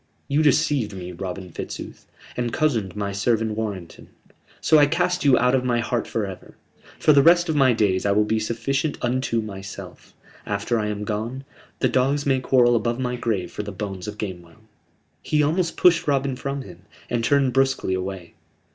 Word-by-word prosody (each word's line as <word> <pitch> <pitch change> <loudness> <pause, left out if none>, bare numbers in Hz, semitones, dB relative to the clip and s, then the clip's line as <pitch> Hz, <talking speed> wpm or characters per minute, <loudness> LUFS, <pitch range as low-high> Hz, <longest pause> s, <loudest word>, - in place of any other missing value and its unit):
You 145 +2 +2
deceived 145 -7 +2
me, 90 -1 -7
Robin 90 0 -6
Fitzooth, - - -8 0.3
and 120 -1 -2
cozened 115 - 0
my 100 -1 -2
servant 110 +2 0
Warrenton. 105 -6 -5 0.5
So 155 - +5
I 145 - +6
cast 180 +3 0
you 135 -4 +5
out 125 +1 +3
of 130 -1 +2
my 120 -2 +1
heart 120 0 -1
for 110 -2 -2
ever. 95 -2 -10 0.4
For 150 - +4
the 140 - +6
rest 175 +3 +5
of 160 - 0
my 135 -3 +5
days 100 -4 +1
I 100 - +2
will 105 +1 +3
be 110 +1 0
sufficient 130 +7 -1
unto 120 -2 0
myself: 100 -2 -9 0.3
after 120 -2 -1
I 105 - -1
am 105 0 -3
gone, 110 +5 -4 0.4
the - - +4
dogs 135 +3 +1
may 135 -2 +2
quarrel 125 -2 +4
above 115 +2 0
my 125 -1 -1
grave 110 -6 -2
for - - -4
the 105 0 -6
bones 100 -2 -6
of 105 0 -6
Gamewell." 90 0 -7 0.6
He 150 -1 +1
almost 165 +3 0
pushed 175 -3 +4
Robin 135 -2 +1
from 140 +1 -4
him, 90 -5 -12 0.3
and 120 -1 -1
turned 135 -1 +2
brusquely 135 -7 +1
away. 95 -2 -5
120 Hz, 185 wpm, -23 LUFS, 105-140 Hz, 0.6 s, I